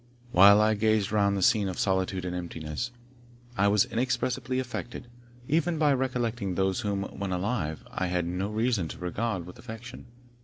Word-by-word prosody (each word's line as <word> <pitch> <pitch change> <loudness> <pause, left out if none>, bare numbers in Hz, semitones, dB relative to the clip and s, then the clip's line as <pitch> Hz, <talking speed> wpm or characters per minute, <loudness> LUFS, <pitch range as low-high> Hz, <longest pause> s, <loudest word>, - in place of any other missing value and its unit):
While 100 +3 +8
I 110 0 +4
gazed 110 -1 +1
round 100 -2 +2
the 95 - 0
scene 100 0 +3
of 90 - -5
solitude 95 -1 0
and 90 0 -3
emptiness, 85 +4 -4 0.7
I 100 -2 +3
was 105 +3 +4
inexpressibly 125 +1 -1
affected, 125 -2 -5 0.4
even 165 +2 +1
by 150 -2 +4
recollecting 120 -7 -1
those 95 +3 +1
whom, 100 -4 -1 0.2
when 100 -1 -2
alive, 90 -4 -2
I 95 - -2
had 90 -1 0
no 90 +3 -2
reason 110 -4 0
to - - -8
regard 95 +1 -2
with 90 - -12
affection. 120 +1 -9
105 Hz, 165 wpm, -28 LUFS, 95-120 Hz, 0.7 s, While